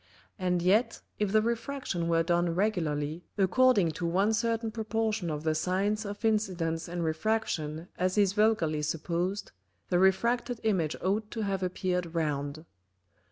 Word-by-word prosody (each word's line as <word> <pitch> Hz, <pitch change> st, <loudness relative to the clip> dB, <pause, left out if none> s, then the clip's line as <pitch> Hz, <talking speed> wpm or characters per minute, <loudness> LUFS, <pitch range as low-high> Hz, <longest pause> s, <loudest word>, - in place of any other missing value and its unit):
And 180 Hz, -2 st, 0 dB
yet 205 Hz, +7 st, +3 dB, 0.2 s
if 210 Hz, -2 st, +1 dB
the 215 Hz, 0 st, +4 dB
Refraction 235 Hz, -6 st, -2 dB
were 165 Hz, 0 st, +3 dB
done 175 Hz, 0 st, +1 dB
regularly 165 Hz, -5 st, -1 dB
according 200 Hz, -1 st, +4 dB
to 170 Hz, +3 st, -4 dB
one 195 Hz, +6 st, +2 dB
certain 230 Hz, 0 st, 0 dB
Proportion 220 Hz, -4 st, -1 dB
of 150 Hz, -1 st, -3 dB
the 160 Hz, -1 st, +1 dB
Sines 195 Hz, +6 st, 0 dB
of 205 Hz, +2 st, -5 dB
Incidence 180 Hz, -7 st, 0 dB
and 175 Hz, 0 st, -3 dB
Refraction 160 Hz, -2 st, -1 dB
as 185 Hz, +2 st, 0 dB
is 200 Hz, -2 st, +4 dB
vulgarly 205 Hz, -8 st, +2 dB
supposed, 170 Hz, +5 st, -2 dB, 0.4 s
the 175 Hz, -, +3 dB
refracted 235 Hz, +6 st, +2 dB
Image 185 Hz, -8 st, +1 dB
ought 210 Hz, +3 st, 0 dB
to 225 Hz, -, -4 dB
have 195 Hz, -2 st, -1 dB
appeared 180 Hz, -2 st, -2 dB
round. 150 Hz, -1 st, -2 dB
185 Hz, 145 wpm, -29 LUFS, 165-215 Hz, 0.4 s, the